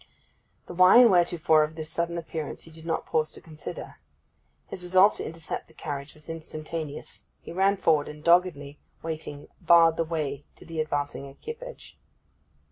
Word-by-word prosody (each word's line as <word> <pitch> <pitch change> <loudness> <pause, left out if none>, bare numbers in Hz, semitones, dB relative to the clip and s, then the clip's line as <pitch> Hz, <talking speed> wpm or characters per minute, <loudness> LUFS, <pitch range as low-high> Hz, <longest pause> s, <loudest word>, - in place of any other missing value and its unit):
The - - -9
why 185 +4 +7
and 240 -3 +8
wherefore 170 -3 +4
of 155 +1 -4
this 155 -1 -5
sudden 170 0 -2
appearance 160 -2 -5
he 165 - -13
did 160 +1 -11
not 165 - -1
pause 155 -1 0
to - - -8
consider. 155 -2 -9 0.7
His 185 - -8
resolve 185 +3 +5
to - - -4
intercept 165 0 -6
the 160 - -22
carriage 145 -2 -6
was 155 - -10
instantaneous. 155 -1 -6
He - - -10
ran 195 +3 +2
forward, 155 -6 +2
and 150 0 -11
doggedly 170 -5 +2 0.2
waiting 155 -3 -6
barred 165 -1 +6
the 165 - +2
way 150 -4 -3
to - - -15
the 165 -1 -3
advancing 145 -2 -3
equipage. 465 - -10
160 Hz, 165 wpm, -27 LUFS, 150-170 Hz, 0.7 s, and